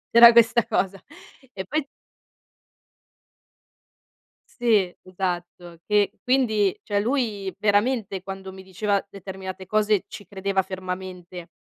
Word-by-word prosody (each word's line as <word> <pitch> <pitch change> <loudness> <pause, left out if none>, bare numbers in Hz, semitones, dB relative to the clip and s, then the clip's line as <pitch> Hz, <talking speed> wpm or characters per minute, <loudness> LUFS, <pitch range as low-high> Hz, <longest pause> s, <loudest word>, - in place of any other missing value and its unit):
C'era 235 0 +11
questa 235 0 +5
cosa. 195 0 -1 0.5
E 190 -1 -5
poi 300 +5 -2 2.7
Sì, 215 -7 +2
esatto. 175 -2 -5
Che 210 -1 +2
quindi 220 -7 +2
cioè 205 -1 0
lui 210 -5 -1
veramente 205 -2 +1
quando 190 0 -7
mi 190 0 -11
diceva 200 +2 -1
determinate 190 -1 -8
cose 215 -1 +2
ci 205 - -10
credeva 195 0 -1
fermamente, 180 -2 -7
195 Hz, 105 wpm, -24 LUFS, 185-215 Hz, 2.7 s, C'era